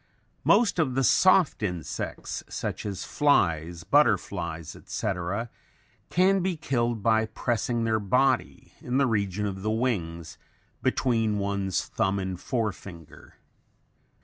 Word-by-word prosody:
Most 230 -6 +4
of 135 -6 +1
the 135 - +2
soft 185 - +4
insects, 90 -7 -4
such - - -4
as 100 -2 -4
flies, 85 - +1
butterflies, 85 - +1
etc., 100 +4 -3 0.6
can 190 +2 +3
be 180 -2 -1
killed 120 -6 -1
by 110 0 +3
pressing 115 +1 -1
their 110 -1 +1
body, 125 +6 0
in 125 +1 -1
the 140 - +4
region 105 -4 -1
of 95 -2 -4
the 110 - -1
wings, 90 -9 -2 0.4
between 115 -4 +1
one's 100 -1 -1
thumb 95 +1 0
and 95 -2 -3
forefinger. 100 - -5
110 Hz, 120 wpm, -27 LUFS, 95-125 Hz, 0.6 s, Most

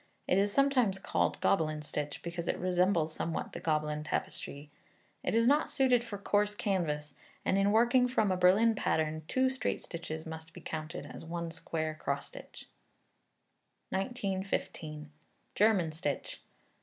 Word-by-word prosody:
It 185 - +4
is 200 +1 +2
sometimes 255 -6 +3
called 195 - 0
Gobelin 155 -4 +2
stitch, 145 0 -4
because 170 0 -4
it - - 0
resembles 180 -3 +2
somewhat 165 - -3
the - - -5
Gobelin 150 -1 0
tapestry. 145 -1 -4 0.5
It - - -1
is 230 0 +4
not 290 +4 +4
suited 255 -3 +3
for 225 -4 -6
coarse 205 +1 +1
canvas, 150 -8 -1 0.3
and, - - +2
in 195 +1 +3
working 240 +3 +5
from 220 -5 +2
a - - +2
Berlin 190 +6 +5
pattern, 155 -6 0
two 260 0 +2
straight 265 -2 -2
stitches 160 -2 -6
must 160 0 -8
be - - -9
counted 155 +1 -5
as - - -9
one 170 0 -4
square 160 -1 -3
cross 155 - -2
stitch. - - -11 1.2
1915. 190 - -3 0.4
German 200 -6 +3
Stitch. 150 -2 -3
180 Hz, 145 wpm, -32 LUFS, 155-210 Hz, 1.2 s, working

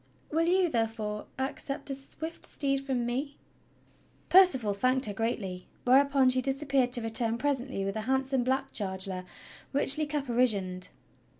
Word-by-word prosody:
"Will 325 +2 +1
you, 365 +1 +3
therefore, 225 -5 -2
accept 275 +1 -3
a - - 0
swift 315 +4 -7
steed 275 -1 0
from 260 -3 -1
me.?" 270 +4 -3 0.9
Percival 305 - +5
thanked 255 +6 +2
her 205 - -3
gratefully, 195 -4 -3 0.2
whereupon 270 +1 +4
she 255 0 +1
disappeared 270 -1 +1
to 240 - +4
return 225 0 +2
presently 265 -6 -2
with 195 - -3
a 220 - -2
handsome 265 -1 +1
black 260 +2 -1
charger 190 -2 -3 0.5
richly 285 +2 +3
caparisoned. 235 -10 0
255 Hz, 135 wpm, -29 LUFS, 225-275 Hz, 0.9 s, Percival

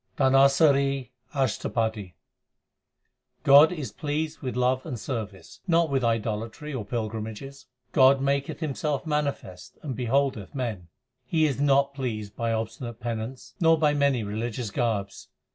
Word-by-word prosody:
DHANASARI 135 -1 +4 0.2
ASHTAPADI 110 - -1 1.3
God 145 +4 +8
is 150 -11 -5
pleased 155 +4 -3
with 130 -4 -4
love 125 +1 +1
and 120 - -5
service, 105 -6 -6
not 165 -3 +3
with 135 -2 +1
idolatry 115 +5 -2
or 125 -5 -3
pilgrimages: 110 +5 -5 0.2
God 135 0 +5
maketh 140 +3 -1
Himself 150 -1 -2
manifest 145 - -3
and 135 -5 -4
beholdeth 130 -2 -1
men. 110 -10 -3 0.4
He 160 +2 +2
is 140 -2 -1
not 140 -1 +3
pleased 110 -7 -4
by 115 -1 -1
obstinate 115 +1 -4
penance 120 +2 -5
nor 165 -1 +5
by 150 -2 +3
many 140 -5 +2
religious 110 +2 -4
garbs. 105 -5 -2
130 Hz, 125 wpm, -26 LUFS, 110-140 Hz, 1.3 s, God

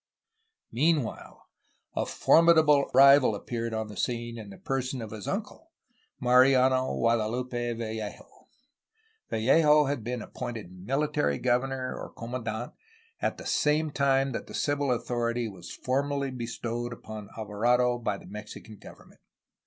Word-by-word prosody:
Meanwhile, 145 -2 -1 0.5
a - - -1
formidable 160 -4 +5
rival 135 -3 +7
appeared 115 +2 -4
upon 110 0 -2
the 105 - -10
scene 120 +2 -3
in 105 -2 -9
the 95 - -11
person 130 -1 -3
of 110 -2 -7
his 110 -2 -7
uncle, 275 - -5 0.5
Mariano 130 +1 +4
Guadalupe 120 +1 0
Vallejo. 110 -2 -7 0.8
Vallejo 150 +6 +4
had 140 -4 -2
been 120 -1 -4
appointed 115 -7 -7
military 100 - -1
governor, 130 +1 -1
or - - -7
com 115 +1 -9
mandant, 115 -1 -4 0.5
at - - -1
the - - -10
same 150 +1 +1
time 135 -1 +2
that - - -5
the - - -8
civil 145 -2 0
authority 120 -1 -1
was 90 -5 -10
formally 140 +1 -1
bestowed 120 -1 -4
upon 110 -3 -9
Alvarado 120 +3 +1
by 105 -4 -2
the - - -14
Mexican 105 +2 -10
govern - - -14
ment. - - -23
120 Hz, 135 wpm, -28 LUFS, 110-135 Hz, 0.8 s, rival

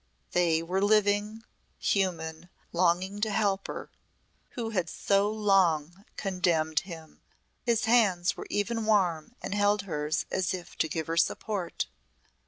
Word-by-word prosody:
They 165 -2 +2
were 185 +3 -1
living, 210 +1 +2 0.3
human, 170 -3 -1 0.2
longing 185 +3 +1
to 220 - +1
help 200 -2 0
her - - -7 0.7
who 225 -2 -2
had 180 -5 -1
so 200 +1 +2
long 195 -4 +2
condemned 170 -5 +1
him. 165 -4 -11 0.4
His 230 -2 +1
hands 205 -7 +3
were - - -8
even 220 +2 -1
warm 185 -1 +1
and - - -3
held 205 0 +2
hers 150 -4 -2
as 185 0 0
if 175 -2 -10
to - - +2
give 160 0 -2
her 165 +2 -3
support. 190 0 0
190 Hz, 135 wpm, -29 LUFS, 170-205 Hz, 0.7 s, hands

